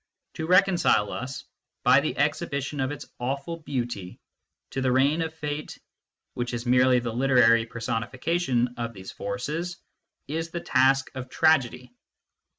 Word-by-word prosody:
To 160 - -4
reconcile 180 - +4
us, 130 +1 -6 0.4
by - - +6
the - - -2
exhibition 140 +1 -1
of 130 0 0
its 145 - -7
awful 140 +6 -3
beauty, 120 - -4 0.5
to 135 - -2
the 130 -1 +2
reign 140 +5 +3
of 160 -1 -2
Fate 150 -1 -5 0.6
which 120 0 -3
is 120 +1 -5
merely 125 +1 +4
the 120 -2 -2
literary 120 -3 +4
personifica 115 +8 -2
tion 125 -5 +1
of 115 -1 -4
these 95 -2 -9
forces 155 - -4 0.5
is 165 +3 -3
the 170 - -4
task 135 -2 +2
of 130 -1 -7
tragedy. 125 -5 +2
130 Hz, 145 wpm, -26 LUFS, 120-150 Hz, 0.6 s, by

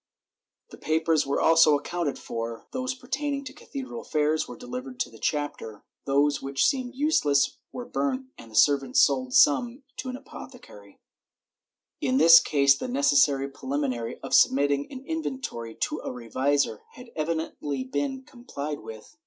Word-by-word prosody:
The - - -12
papers 160 -1 +1
were 140 - 0
also 160 -2 +5
accounted 165 +1 -3
for 115 0 -6
— - - -56
those 255 0 -2
pertaining 275 +2 -3
to 260 -1 -9
cathedral 270 -4 -7
affairs 155 +1 0
were - - -9
delivered 255 +1 -7
to - - -2
the - - -15
chapter, 145 -8 -3 0.2
those 145 +1 +2
which 135 0 0
seemed 255 -1 0
useless 150 - +2
were 245 - -6
burnt 265 0 -2
and 115 - -13
the 110 - -13
servants 135 +1 +4
sold 130 -2 +2
some 240 - +4
to 255 - -5
an 255 - -5
apothecary/ 245 - -13 1.0
In 130 -2 +1
this 165 +3 +9
case 140 -2 +3
the 255 - -5
necessary 145 - +3
preliminary 135 -4 -3
of - - -6
submitting 140 +1 +3
an 265 0 -9
inventory 265 - -5
to - - -1
a - - -6
revisor 125 0 -1
had 250 -2 -13
evidently 155 -3 -3
been 145 - -3
complied 150 - -7
with. 110 - -11
150 Hz, 155 wpm, -26 LUFS, -, 1.0 s, this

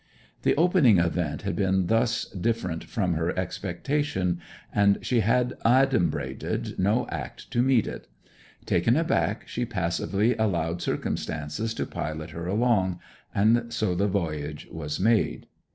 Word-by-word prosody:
The - - +2
opening 160 - +5
event 85 -2 0
had - - -2
been 95 -1 +1
thus 115 +4 +1
different 95 -4 -2
from 95 -7 -1
her 80 +2 -1
expectation, 95 - -1 0.3
and 100 -1 +4
she 125 - +2
had 125 +3 +2
adumbrated 115 - +1
no 105 +6 +2
act - - -7
to 120 - +2
meet 125 -3 +3
it. - - -7 0.6
Taken 115 - +2
aback 160 - 0
she 120 - -3
passively 100 +2 0
allowed 85 -6 0
circumstances 80 +9 -3
to - - -2
pilot 80 +1 -5
her 85 +2 -5
along; 95 -4 +1 0.4
and 115 +3 +3
so 110 -5 0
the 100 +4 +1
voyage 75 -6 -3
was 75 -2 -4
made. 110 +3 +2
100 Hz, 135 wpm, -26 LUFS, 85-115 Hz, 0.6 s, opening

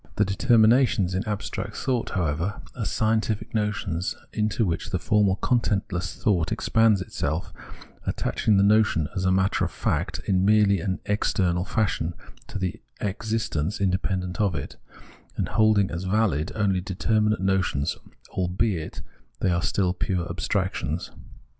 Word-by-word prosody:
The 105 - +3
determinations 110 -1 +4
in 95 +2 0
abstract 105 -1 -4
thought, 125 -3 -1
however, 85 +2 -1 0.2
are - - -3
scientific 110 -1 0
notions, 100 -5 -1 0.2
into 110 +1 +1
which 85 -3 -2
formal 95 +1 +2
contentless 100 -7 0
thought 90 -5 +1
expands 110 -3 +3
itself, 80 -2 -3 0.5
attaching 105 -2 +1
the 100 - +5
notion, 105 -6 +3
as 95 -1 -1
a 95 - +3
matter 95 +1 +2
of - - 0
fact - - -2
in 95 -1 +2
merely 105 -1 +4
an 95 +2 -2
external 90 -3 +1
fashion, 95 -6 -1 0.3
to - - -5
the 95 -2 -3 0.2
existence 105 -4 -2
inde 95 -1 +1
pendent 90 -1 -2
of 100 -5 +1
it, 70 - -5 0.6
and - - -1
holding 110 -3 +3
as 85 +3 -4
valid 95 -6 +1
only 100 -4 +1
determinate 105 +3 +1
notions, 95 -7 0 0.4
albeit 90 -1 -1 0.4
they 95 - +2
are 85 0 +1
still 90 0 +1
pure 90 -1 -2
abstractions. 90 -1 -2
95 Hz, 135 wpm, -25 LUFS, 90-105 Hz, 0.6 s, the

